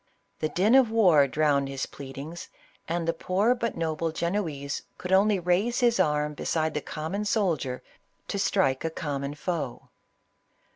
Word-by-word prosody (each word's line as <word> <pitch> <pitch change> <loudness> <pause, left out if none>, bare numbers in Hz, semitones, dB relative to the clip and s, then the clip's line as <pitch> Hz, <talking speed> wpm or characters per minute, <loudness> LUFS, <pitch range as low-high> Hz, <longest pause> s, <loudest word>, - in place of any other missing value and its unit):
The 155 - -1
din 200 +8 +2
of 265 -3 +6
war 180 -11 +5
drowned 140 -1 +1
his 135 -1 -3
pleadings, 140 +5 -8 0.4
and 170 0 -2
the 165 - +2
poor 195 +8 +1
but 235 -5 -3
noble 165 0 -1
Genoese 160 -5 -2 0.2
could 180 - -6
only 200 +2 +4
raise 185 +7 +1
his 235 -1 +3
arm 150 0 +1
be - - -7
side 160 -1 0
the 150 - -2
common 165 +9 -4
soldier 170 - 0 0.4
to 200 - -3
strike 185 -9 +1
a 165 - 0
common 145 -2 -4
foe. 155 -6 -4
165 Hz, 155 wpm, -27 LUFS, 145-195 Hz, 0.4 s, of